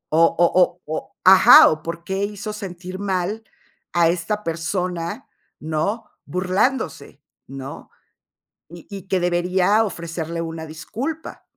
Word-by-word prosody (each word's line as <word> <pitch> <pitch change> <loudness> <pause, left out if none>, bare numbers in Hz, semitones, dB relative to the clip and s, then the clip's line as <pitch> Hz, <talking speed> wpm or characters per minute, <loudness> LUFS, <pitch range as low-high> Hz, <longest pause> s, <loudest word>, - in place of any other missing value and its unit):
O-o-o-o 170 0 +2 0.2
ajá, 190 0 +9
o 155 0 -2
por 170 0 -6
qué 190 +1 -2
hizo 210 +1 -6
sentir 185 -2 -7
mal 200 +2 -2 0.5
a 170 -1 +4
esta 180 +5 -2
persona, 170 0 -3 0.3
¿no?, 160 +9 -2 0.2
burlándose, 180 - -1 0.3
¿no? 135 0 -9 0.8
Y 170 0 -12
y 195 -2 -9
que 190 -1 +1
debería 180 +4 +2
ofrecerle 165 -3 -5
una 165 -1 -5
disculpa. 240 - -6
180 Hz, 110 wpm, -21 LUFS, 165-195 Hz, 0.8 s, ajá